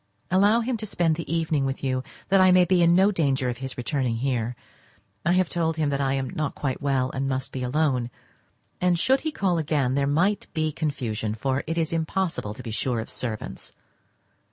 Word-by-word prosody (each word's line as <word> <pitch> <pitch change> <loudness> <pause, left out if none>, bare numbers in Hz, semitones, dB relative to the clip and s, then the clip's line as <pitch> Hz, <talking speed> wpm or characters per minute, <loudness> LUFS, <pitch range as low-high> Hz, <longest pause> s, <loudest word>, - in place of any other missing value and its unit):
Allow 205 +5 +4
him 240 +1 -1
to 215 0 -5
spend 170 -5 +1
the 165 0 -6
evening 160 -3 +1
with 135 +1 -3
you, 130 -1 0 0.3
that 195 0 +5
I 185 0 +6
may 180 0 +6
be 180 0 +3
in 170 0 +5
no 195 +3 +5
danger 135 -8 +1
of 120 0 -4
his 135 -1 -6
returning 125 0 -1
here. 120 -1 -1 0.7
I 170 - +3
have 185 -1 +3
told 165 -2 -1
him 150 -2 +1
that 140 0 0
I 135 -1 +1
am 135 -2 -2
not 155 -3 -2
quite 135 -3 -3
well, 135 -2 +1
and 135 +1 -2
must 130 0 -2
be 130 - -5
alone; 125 -2 +1 0.7
and 180 -1 +3
should 260 +10 +2
he 315 - -2
call 185 - 0
again 145 -5 +1
there 140 0 +1
might 180 +8 +1
be 155 -1 +1
confusion, 115 -9 -2
for 130 +4 -1
it 165 +1 -2
is 165 -1 0
impossible 165 - -1
to - - -9
be 115 - -5
sure 120 +2 -1
of 110 - -6
servants. 110 -4 -5
145 Hz, 210 wpm, -25 LUFS, 130-175 Hz, 0.7 s, I